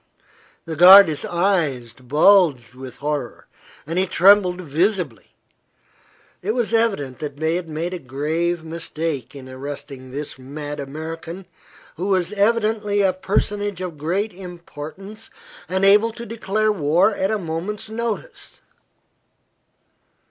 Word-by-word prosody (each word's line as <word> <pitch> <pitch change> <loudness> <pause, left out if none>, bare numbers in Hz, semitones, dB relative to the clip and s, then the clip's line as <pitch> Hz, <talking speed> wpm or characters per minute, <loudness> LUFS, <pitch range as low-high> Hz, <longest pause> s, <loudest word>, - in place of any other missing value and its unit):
The 160 - -5
guarde's 180 -2 +8
eyes 165 -10 0
bulged 140 - +3
with 130 0 -10
horror 145 -4 -4 0.4
and 165 +4 -2
he 190 - +1
trembled 185 -1 +4
visibly. 165 - -2 1.1
It 215 +5 -2
was 235 -2 -1
evident 195 - 0
they 155 +2 -2
had 175 -1 -3
made 165 +4 -3
a 180 - -4
grave 160 +5 -2
mistake 160 -3 -5
in 130 -2 -10
arresting 135 0 -8
this 140 +1 -6
mad 145 +3 -7
American, 160 +5 -7 0.5
who 180 +4 -3
was 190 -1 0
evidently 210 -1 +1
a 190 -1 +3
personage 205 +1 -1
of 175 -5 -6
great 190 +7 -1
importance 180 +3 -10 0.4
and 190 +1 +1
able 210 +3 +5
to 235 +1 -8
declare 215 -1 -1
war 170 +1 +2
at 190 - -1
a 215 - 0
moment's 180 +4 -4
notice. 230 - -5
170 Hz, 120 wpm, -21 LUFS, 145-200 Hz, 1.1 s, guarde's